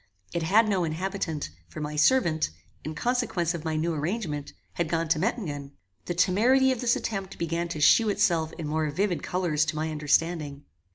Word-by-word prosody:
It 170 - -1
had 210 +7 +4
no 195 -4 +1
inhabitant, 165 - -3 0.2
for 80 - -9
my 150 0 -4
servant, 160 - +3 0.3
in 155 +1 -5
consequence 215 -5 0
of 170 -3 -5
my 160 -1 -2
new 165 +2 0
arrangement, 155 -2 -3 0.2
had 170 -2 -2
gone 165 0 0
to 165 -1 +2
Mettingen. 150 - -3 0.3
The 175 - -3
temerity 240 +9 +4
of 255 - -2
this 240 -1 +3
attempt 195 -3 -4
began 170 +1 -1
to 165 -2 -5
shew 215 +8 +5
itself 175 -6 +1
in 160 -3 -6
more 155 0 0
vivid 180 +4 0
colours 175 -4 0
to 155 - -3
my 155 +1 -2
understanding. 150 -1 0
170 Hz, 180 wpm, -27 LUFS, 155-195 Hz, 0.3 s, shew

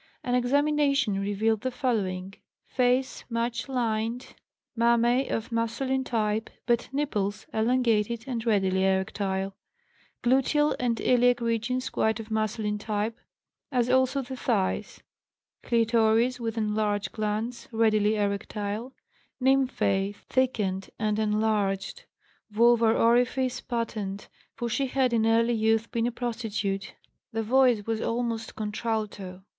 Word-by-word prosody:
An 245 - -1
examination 275 -3 +2
revealed 205 +2 0
the 255 - -1
following: 195 -8 -2 0.3
Face 255 +1 0
much 235 +2 -2
lined, 235 -1 -2 0.4
mammæ 235 +2 +3
of 225 +2 -3
masculine 235 +4 -1
type, 220 -3 -1 0.2
but 240 -1 +1
nipples 210 -8 -2
elongated 230 -1 +1
and 240 -4 -3
readily 190 -4 +2
erectile; 190 0 0 0.7
gluteal 270 +4 +3
and 240 -2 0
iliac 245 0 +3
regions 235 +2 -1
quite 220 0 +1
of 220 0 -8
masculine 215 -1 -1
type, 215 +1 -2 0.6
as 250 -2 +1
also 260 +1 +2
the 260 +1 -7
thighs; 220 -7 -1 0.6
clitoris, 230 +1 +2
with 230 -1 -3
enlarged 210 -2 0
glands, 215 +3 -3
readily 215 -2 +3
erectile; 205 +3 -3 0.4
nymphæ 250 -7 +1
thickened 205 -7 -1
and 215 -1 0
enlarged; 210 -2 0 0.5
vulvar 230 +1 +4
orifice 245 +2 +2
patent, 215 -5 -4 0.3
for 240 - -3
she 270 +4 0
had 255 -1 +1
in 225 -1 +2
early 230 +1 +3
youth 225 0 +1
been 230 0 0
a - - -1
prostitute; 220 -5 -3 0.4
the 225 0 -2
voice 245 -2 +3
was 225 -1 -2
almost 230 -1 -2
contralto. 210 -3 -4
225 Hz, 115 wpm, -27 LUFS, 210-245 Hz, 0.7 s, vulvar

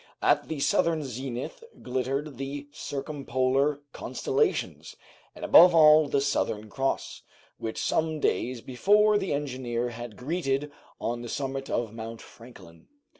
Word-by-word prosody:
At - - +3
the 160 -2 -4
southern 160 +2 +2
zenith 130 - -6 0.2
glittered 130 +2 -3
the 140 +1 -5
circumpolar 140 -1 -1
constellations, - - -1 0.4
and - - -6
above 175 0 +8
all 155 -1 +7
the 140 0 +1
Southern 110 -6 -1
Cross, 135 0 -2 0.4
which 110 - -4
some 160 -1 0
days 125 -4 0
before 205 - +3
the 195 - -3
engineer 130 -4 -2
had 120 -2 -8
greeted 145 0 -2 0.3
on 120 0 -3
the 120 - -7
summit 135 0 -3
of 115 -2 -2
Mount 115 0 -7
Franklin. 95 -9 -15
135 Hz, 125 wpm, -27 LUFS, 120-150 Hz, 0.4 s, above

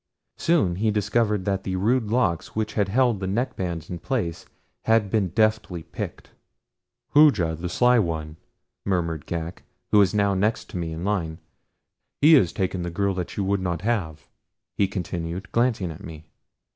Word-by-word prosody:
Soon 145 - +2
he 110 +2 +1
discovered 105 -1 +1
that 95 -1 -1
the 95 - -2
rude 115 +6 +2
locks 105 -8 0
which 110 0 -1
had 100 -3 +1
held 120 -1 +2
the 95 - -3
neckbands 95 - -2
in 85 - -6
place 100 -10 -3 0.4
had 110 -3 +3
been 105 -4 +2
deftly 110 -3 0
picked. 85 - -7 0.8
"Hooja 110 - +5
the 85 +2 -5
Sly 125 +6 +4
One," 80 -5 -2 0.5
murmured 85 -5 -1
Ghak, 85 +1 -4 0.3
who 105 - +6
was 100 -1 +4
now 100 -1 +3
next 105 +4 -1
to - - -5
me 85 -2 -3
in 80 +2 -5
line. 85 -6 -1 0.8
"He 155 +3 +7
has 95 - +5
taken 95 -3 -2
the 85 - -3
girl 100 +3 0
that 90 -2 -5
you 100 - 0
would 100 0 0
not 90 0 -2
have," 85 -10 -2 0.5
he 100 - +2
continued, 90 -1 -5
glancing 115 -7 +1
at 80 +5 -11
me. 80 -3 -9
95 Hz, 170 wpm, -24 LUFS, 85-110 Hz, 0.8 s, He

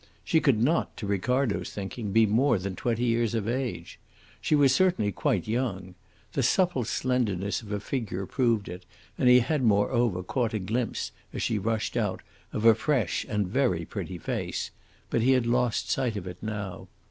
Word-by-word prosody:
She 160 - +3
could 130 -7 +3
not, 150 +9 +1
to 105 - -5
Ricardo's 110 +4 0
thinking, 100 +1 -5
be 110 +2 +5
more 115 +4 +3
than 95 0 -4
twenty 120 +2 -1
years 115 -1 +1
of 110 -2 -1
age. 125 +1 -3 0.4
She 155 - +2
was 140 -3 +5
certainly 175 - +2
quite 105 - 0
young. 105 -6 -2 0.4
The 135 - 0
supple 135 - +2
slenderness 105 -6 -1
of 110 - -12
her 105 0 -2
figure 105 -4 -3
proved 115 -3 +1
it, 90 +1 -7 0.3
and 125 - +3
he 125 0 +7
had 145 +4 0
moreover 110 -3 +2
caught 115 +3 -1
a - - 0
glimpse, 115 +5 -2 0.2
as - - -3
she 110 - 0
rushed 110 +3 -1
out, 105 -6 -1 0.3
of 110 - -2
a 115 - +9
fresh 115 - 0
and 105 -3 0
very 95 -7 +1
pretty 90 - -5
face; - - -3 0.4
but 115 - +2
he 130 +3 +4
had 130 -2 +2
lost 120 0 +1
sight 120 -5 0
of 95 - -5
it 90 -1 -8
now. 100 -4 -5
115 Hz, 180 wpm, -27 LUFS, 100-125 Hz, 0.4 s, a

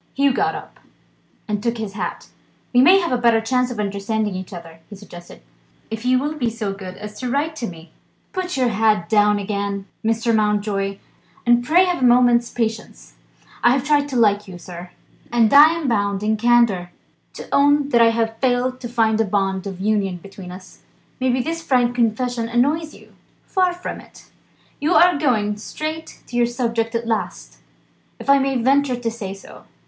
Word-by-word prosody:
Hugh 275 -1 +3
got 400 +6 0
up, 405 - -10 0.7
and 210 -1 -2
took 235 +1 -1
his 215 -3 -5
hat: 210 - -5 0.4
"We 245 - +6
may 365 +8 +7
have 340 -6 -2
a 250 - +1
better 235 -2 +4
chance 250 +2 0
of 240 -3 -6
understanding 210 +1 -2
each 185 0 -7
other," 165 -3 -10
he 205 - -9
suggested, 175 - -13 0.5
"if 225 +2 -5
you 255 0 +3
will 290 +4 -2
be 255 -6 -1
so 215 -3 -4
good 185 -2 -9
as 210 0 -9
to 255 - -3
write 295 +5 -1
to 235 - -3
me." 165 -2 -11 0.4
"Put 365 -5 -3
your 255 -2 +2
hat 210 -5 +1
down 210 -1 +4
again, 200 -1 -3 0.2
Mr. 225 +1 +1
Mountjoy, 205 -2 0 0.5
and 240 0 +4
pray 340 +8 +4
have 355 -4 -1
a 250 - +5
moment's 240 -1 +4
patience. 220 - -4 0.5
I've 250 +2 +4
tried 290 0 +1
to 265 - -5
like 205 -3 +2
you, 185 -2 -9
sir 175 0 -10 0.4
and 230 -1 +3
I'm 310 +2 +6
bound 200 -3 0
in 215 +1 +1
candour 225 -6 +2 0.4
to - - -9
own 285 0 +3
that 240 -4 +4
I've 225 -1 +2
failed 255 0 0
to 240 - -6
find 225 -2 +1
a - - +3
bond 195 -2 -1
of 190 -2 -7
union 200 -2 0
between 190 0 -11
us. 185 +1 -12 0.4
Maybe, 255 -1 +1
this 330 +3 -3
frank 245 -5 +1
confession 235 0 0
annoys 295 +7 0
you." - - -18 0.3
"Far 370 -2 +1
from 355 0 -7
it! - - -18 0.5
You 315 +5 +1
are 355 -4 +5
going 215 -8 +1
straight 310 +8 -7
to 240 - -10
your 240 -1 +3
subject 235 -2 -2
at 230 0 -2
last, 135 - -3 0.6
if 275 - 0
I 280 - +6
may 270 -1 0
venture 270 +1 +2
to 230 -2 -2
say 195 -4 -6
so." 195 - -14
230 Hz, 185 wpm, -20 LUFS, 205-260 Hz, 0.7 s, may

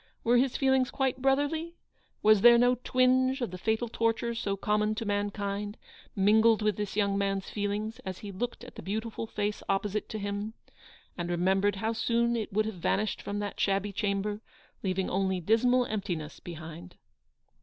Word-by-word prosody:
Were 240 +1 +4
his 255 +1 +2
feelings 265 -1 +3
quite 265 -2 -1
brotherly? 290 +5 +1 0.5
was 215 -2 +6
there 235 +1 +8
no 245 0 +3
twinge 255 +1 +3
of 240 -8 -2
the 185 - -6
fatal 220 +4 0
torture 230 +1 0
so 200 -4 -2
common 210 +1 +1
to 225 - -4
mankind 205 0 -2 0.4
mingled 220 +2 +4
with 210 -2 +2
this 210 -1 -4
young 200 -1 +1
man's 195 -1 -1
feelings 210 +2 -2
as 185 -1 -6
he 205 - -8
looked 240 +6 -4
at 245 - -11
the - - -9
beautiful 220 +3 -4
face 210 -1 -2
opposite 200 +1 -1
to 220 - -4
him, 205 +2 -4 0.6
and 175 0 -2
remem 185 +2 +2
bered 205 0 +2
how 220 +3 -1
soon 235 +1 +1
it 220 -3 -3
would 215 +2 +1
have 215 -5 -5
vanished 210 +3 0
from 205 - -4
that 205 -1 -4
shabby 200 +1 +1
chamber, 205 +1 -1 0.4
leaving 190 -1 -1
only 190 0 0
dismal 245 +7 +3
emptiness 175 -9 -4
behind 170 +1 -9
210 Hz, 175 wpm, -29 LUFS, 195-235 Hz, 0.6 s, there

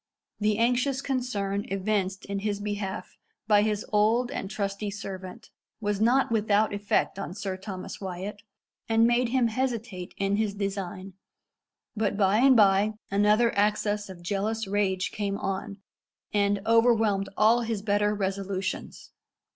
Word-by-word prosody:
The 210 0 +1
anxious 250 +3 +2
concern 215 -7 -2
evinced 195 -1 -1
in 200 0 -3
his 205 0 -2
behalf 205 -3 -4 0.3
by 210 -2 +5
his 210 -1 -1
old 225 +4 +3
and 195 - -4
trusty 200 0 -3
servant 195 +1 -8 0.3
was 205 -2 -1
not 245 +3 +3
without 215 -1 +2
effect 205 -1 0
on 180 - -5
Sir 200 -2 -3
Thomas 190 0 -7
Wyat, 190 +2 -5 0.5
and 225 0 +4
made 240 +1 +2
him 245 -2 +2
hesitate 230 -6 -3
in 195 +1 +1
his 210 -2 0
design; 195 -1 -4 0.8
but 210 -2 0
by 200 0 +3
and 260 0 +6
by 205 +1 +4 0.2
another 210 +4 +3
access 205 0 +1
of 175 -2 -10
jealous 210 +4 -1
rage 195 -2 0
came 200 -1 -2
on, 195 +1 -4 0.6
and 200 -1 +2
overwhelmed 225 -4 +3
all 225 +3 +5
his 225 -3 -3
better 205 0 +1
resolutions. 195 -1 -3
205 Hz, 140 wpm, -27 LUFS, 195-220 Hz, 0.8 s, and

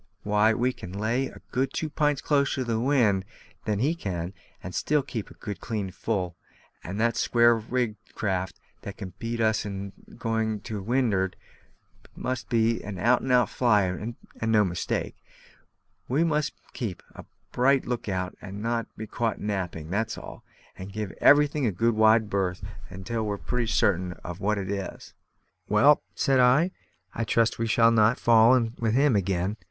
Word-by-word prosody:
Why, 105 +1 +3
we 125 +2 +1
can 90 - -9
lay 115 +6 0
a - - -13
good 130 +1 0
two 160 - -2
pints 150 -1 0
closer 140 -2 +1
to - - +1
the 115 -2 -1
wind 115 -7 +2 0.4
than 105 -2 0
he 140 +9 +1
can, 90 - -4 0.3
and 95 - -7
still 150 -1 +1
keep 115 -6 -5
a - - -15
good 100 -2 -6
clean 105 -5 -3
full; 90 -5 -2 0.5
and 95 +5 -5
the 115 +1 +3
square 120 0 +4
rigged 115 -1 -3
craft 95 -3 -2 0.2
that 100 - -8
can 95 -4 -7
beat 115 0 -3
us 110 -1 +2
in 100 -1 -6 0.2
going 110 -2 -1
to 105 -2 -5
wind'ard 105 -4 +1 0.8
must 130 -1 -4
be 115 0 +2
an 105 -2 -6
out 120 +6 +3
and 130 - -2
out 125 -1 +5
flyer, 105 -7 +2
and 115 +5 -6 0.4
no 105 -1 +5
mistake. 90 -2 -3 0.9
We 140 +6 +2
must 150 -3 0 0.2
keep 110 -9 -5
a - - -10 0.3
bright 135 +2 +3
look 120 -3 -3
out, 90 -1 -2
and 100 +2 -7
not 115 +1 -1
be 110 - -5
caught 115 +1 -2
napping, 90 -6 -3
that's 110 +3 -1
all; - - -10 0.3
and 95 +1 -8
give 105 -2 -4
everything 145 -2 +5
a - - +1
good 115 +6 +1
wide 110 0 +4
berth 95 -2 -1 0.4
till 115 +3 -2
we're 105 -1 -2
pretty 120 +2 -2
certain 90 -4 +1
of 90 0 -6
what 105 +1 0
it 95 -1 -3
is." 100 -2 -6 0.6
"Well," 140 +9 +5
said 135 -3 +2
I, 130 +9 +4 0.4
"I 115 - -2
trust 115 +1 +1
we 115 - 0
shall 115 +1 +4
not 115 +1 +4
fall 115 +1 +6
in 115 -3 0
with 115 -1 +1
him 140 -2 +4
again. 95 +1 0
110 Hz, 175 wpm, -26 LUFS, 100-125 Hz, 0.9 s, fall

